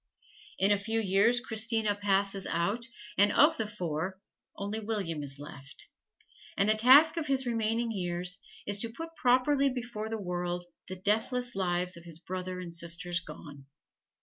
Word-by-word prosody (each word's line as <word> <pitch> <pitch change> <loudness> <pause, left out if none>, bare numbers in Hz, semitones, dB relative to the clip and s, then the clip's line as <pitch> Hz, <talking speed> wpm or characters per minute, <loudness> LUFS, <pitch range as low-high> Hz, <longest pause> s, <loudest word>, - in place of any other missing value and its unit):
In 195 +2 +3
a 205 - +3
few 220 +3 -1
years 210 +4 +3
Christina 225 -3 +2
passes 200 -1 0
out, 205 +8 0 0.3
and 205 +1 +6
of 315 +2 +5
the 220 - -1
four, 185 -2 -4 0.4
only 205 +2 -3
William 205 -8 -2
is 140 -1 -2
left; 140 -1 -8 0.7
and 200 - +3
the 215 - +6
task 270 +9 +6
of 320 - -2
his 265 -1 +1
remaining 230 0 0
years 180 -1 -1 0.3
is 205 0 0
to 230 - 0
put 330 +7 -8
properly 270 +1 +3
before 235 -4 -5
the 225 - -3
world 175 -2 -3 0.2
the 185 - -5
deathless 225 +6 0
lives 180 -1 -1
of 170 - -13
his 165 -2 -8
brother 185 +1 -5
and 175 -2 -7
sisters 170 +1 0
gone. 145 -5 -11
205 Hz, 160 wpm, -30 LUFS, 180-230 Hz, 0.7 s, and